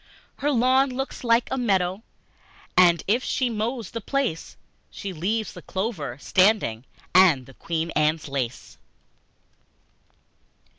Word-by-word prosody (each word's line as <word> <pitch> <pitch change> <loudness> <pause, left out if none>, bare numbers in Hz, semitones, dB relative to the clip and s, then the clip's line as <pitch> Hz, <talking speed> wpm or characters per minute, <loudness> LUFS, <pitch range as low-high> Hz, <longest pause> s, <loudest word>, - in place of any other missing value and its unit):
Her 290 - -1
lawn 260 +1 +3
looks 265 +1 -5
like 230 0 +3
a 265 - -1
meadow, 190 -4 0 0.7
And 170 -3 +5
if 235 +6 +2
she 255 -3 0
mows 225 0 -3
the 230 - -5
place 265 - -2 0.3
She 195 -2 -7
leaves 205 +6 -2
the - - -10
clover 185 - -4
standing 185 - +2 0.3
And 170 -9 +5
the 135 - -15
Queen 165 +4 -3
Anne's 155 +1 +1
Lace! 130 -3 -5
195 Hz, 120 wpm, -24 LUFS, 160-240 Hz, 0.7 s, And